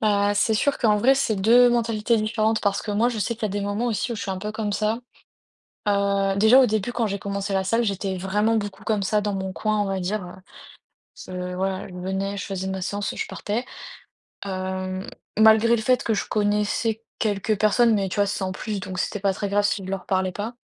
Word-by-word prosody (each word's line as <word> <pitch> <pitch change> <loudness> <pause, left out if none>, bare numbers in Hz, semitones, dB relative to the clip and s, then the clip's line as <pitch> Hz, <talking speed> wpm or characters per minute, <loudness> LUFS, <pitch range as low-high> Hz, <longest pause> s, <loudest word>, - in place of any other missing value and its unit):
Bah, 205 -1 +2
c'est 205 +2 +2
sûr 285 +6 +1
qu'en 215 -4 +3
vrai, 260 +6 +4
c'est 250 -5 0
2 235 +5 +6
mentalités 230 -1 +1
différentes 215 0 +1
parce 200 -1 +1
que 210 - -5
moi, 225 +4 +2
je 230 - -4
sais 225 +3 -1
qu'il 230 - -17
y - - +2
a - - -3
des 205 +1 -3
moments 205 +4 -1
aussi 235 +1 -1
où - - -4
je - - -5
suis 195 - -3
un 190 - -3
peu 210 +2 -4
comme 215 -1 -3
ça. 215 +3 0 0.9
Heu, 200 -1 +1
déjà, 220 +6 +7
au 260 - +5
début, 220 +2 -1
quand 235 -2 0
j'ai 200 0 -3
commencé 200 0 -3
la 190 0 +1
salle, 230 +5 +1
j'étais 195 -3 -2
vraiment 210 +5 +1
beaucoup 205 -3 -4
comme 210 -2 0
ça, 210 +2 +1
dans 205 -1 -2
mon 190 -1 -3
coin, 215 +1 0
on 205 - +2
va 195 0 -2
dire, 190 +3 -2 1.1
heu, - - -7
heu, 180 0 -4
voilà, 190 0 -2
je 185 - -12
venais, 190 +2 -3
je 190 - -4
faisais 190 -1 -4
ma 190 0 -3
séance 205 +2 -2
et - - -10
je - - -2
partais. 215 +4 -3 0.8
Hem, 185 0 -4 0.3
malgré 220 +2 +6
le 225 - -2
fait 250 +3 +2
que 225 - +1
je - - -2
connaissais 210 +2 0 0.2
quelques 210 0 0
personnes. 225 +2 +4
Mais 195 -3 0
tu - - -4
vois, 205 -1 +3
sans 195 -2 -2
plus, 205 +2 -4
donc 185 0 -6
c'était 205 - -2
pas 195 0 +1
très 205 - -2
grave 205 +1 +2
si 205 -1 0
je - - -7
leur 195 -1 -4
parlais 185 -1 +1
pas. 215 +6 -5
205 Hz, 240 wpm, -24 LUFS, 195-220 Hz, 1.1 s, déjà